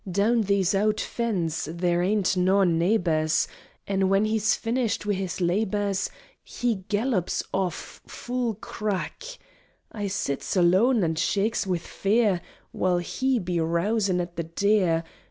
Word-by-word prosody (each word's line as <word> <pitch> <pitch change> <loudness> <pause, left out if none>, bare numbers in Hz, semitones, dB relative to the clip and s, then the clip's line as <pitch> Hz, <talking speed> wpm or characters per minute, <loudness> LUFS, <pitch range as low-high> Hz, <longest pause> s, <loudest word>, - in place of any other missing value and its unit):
Down 210 +6 +2
these 200 -2 +1
owd 210 +2 +1
Fens 175 -9 -2
there 175 +1 0
ain't 195 +1 +1
noa 190 +2 +3
neighbours, 165 -3 +2 0.4
An' 195 -1 +1
when 195 +2 +3
he's 215 -1 +2
finished 230 -2 -1
wi' 205 - +1
his 190 -2 -3
labours, 195 +2 0 0.3
He 240 -3 -1
gallops 210 -3 0
off 185 -3 -3
full 245 -2 -3
crack! 210 - -4 0.7
I 205 -2 -3
sits 190 -7 -2
aloan 190 +6 +4
an' 165 -1 +1
shaakes 205 +3 0
wi' 180 -2 +1
fear 200 +2 +1 0.3
While 180 -1 +1
he 260 +9 0
be 180 -4 -2
rousin' 180 +4 +1
at 175 -1 -5
the 170 - -1
'Deer.' 175 -1 +1
195 Hz, 135 wpm, -26 LUFS, 175-215 Hz, 0.7 s, aloan